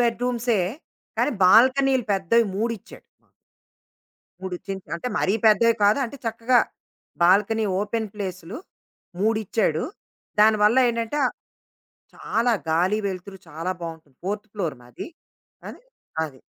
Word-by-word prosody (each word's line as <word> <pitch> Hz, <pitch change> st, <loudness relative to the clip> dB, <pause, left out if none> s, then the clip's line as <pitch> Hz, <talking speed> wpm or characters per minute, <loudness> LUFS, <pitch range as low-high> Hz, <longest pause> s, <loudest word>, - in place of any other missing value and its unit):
బెడ్‌రూమ్సే 240 Hz, -2 st, +1 dB, 0.6 s
కానీ 295 Hz, -, +2 dB
బాల్కనీలు 260 Hz, +6 st, +5 dB
పెద్దవి 200 Hz, +5 st, +3 dB
మూడిచ్చాడు 225 Hz, 0 st, -4 dB, 0.2 s
మాకు. -, -, -37 dB, 1.1 s
3 190 Hz, -1 st, -4 dB
చిన్ 195 Hz, -1 st, -3 dB, 0.2 s
అంటే 170 Hz, -, -4 dB
మరీ 190 Hz, -, +1 dB
పెద్దయి 225 Hz, +2 st, +5 dB
కాదు 210 Hz, +7 st, +4 dB
అంటే 265 Hz, +4 st, -9 dB
చక్కగా 230 Hz, +2 st, +2 dB, 0.6 s
బాల్కనీ 205 Hz, +5 st, +4 dB
ఓపెన్ 220 Hz, +2 st, -2 dB
ప్లేసులు 185 Hz, 0 st, -6 dB, 0.6 s
మూడిచ్చాడు. 215 Hz, -5 st, +1 dB, 0.6 s
దానివల్ల 215 Hz, +2 st, +5 dB
ఏంటంటే 230 Hz, +4 st, -2 dB, 1.0 s
చాలా 235 Hz, +1 st, 0 dB, 0.2 s
గాలి 180 Hz, +6 st, +2 dB
వెలుతురు 190 Hz, 0 st, -6 dB
చాలా 165 Hz, +3 st, -4 dB
బావుంటుంది. 160 Hz, -5 st, -8 dB
4థ్ 205 Hz, +2 st, -3 dB
ఫ్లోర్ 170 Hz, -9 st, -2 dB
మాది. 120 Hz, -1 st, -9 dB, 0.6 s
ఆ -, -, -5 dB, 0.6 s
అది. 135 Hz, -4 st, -9 dB
210 Hz, 110 wpm, -24 LUFS, 185-230 Hz, 1.1 s, బాల్కనీలు